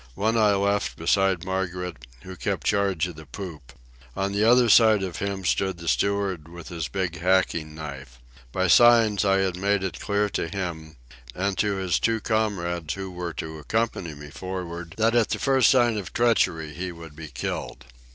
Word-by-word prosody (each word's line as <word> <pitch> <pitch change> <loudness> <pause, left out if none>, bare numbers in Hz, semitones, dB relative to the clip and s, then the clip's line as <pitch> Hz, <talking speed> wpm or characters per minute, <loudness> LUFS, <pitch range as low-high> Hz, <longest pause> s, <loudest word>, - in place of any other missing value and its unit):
One 110 +3 +1
I 105 -3 +4
left 100 +1 0
beside 95 +1 +1
Margaret, 90 -2 -3 0.3
who 95 0 -8
kept - - -3
charge 100 -4 +1
of 90 -4 -7
the 80 -2 -11
poop. 75 -4 -8 0.4
On 100 +1 -1
the 100 +1 +1
other 120 +2 +5
side 110 -2 +6
of 90 -4 -4
him 100 -1 -3
stood 95 +1 0
the 85 0 -9
steward 100 -3 0
with 85 0 -10
his 85 -3 -4
big 90 -4 -3
hacking 85 -4 +1
knife. 70 -5 -8 0.3
By 95 +6 0
signs 115 0 +6
I 95 -1 +3
had 95 -2 0
made 100 +1 +1
it 95 - -4
clear 105 0 0
to 85 - -2
him, 85 -4 -5 0.4
and 100 +1 -1
to 105 -1 +1
his 95 -2 0
two 115 -1 +1
comrades 85 -8 -1
who 95 -1 -6
were 90 -2 -5
to 80 -1 -6
accompany 95 -2 -2
me 75 0 -11
for'ard, 85 -2 -6
that 115 +1 +2
at 120 -2 +3
the - - -1
first 135 -2 +3
sign 120 -4 +3
of 95 - -8
treachery 85 -10 +1
he 90 +2 -4
would 85 -3 -11
be 80 0 -8
killed. - - -5
95 Hz, 185 wpm, -25 LUFS, 85-100 Hz, 0.4 s, side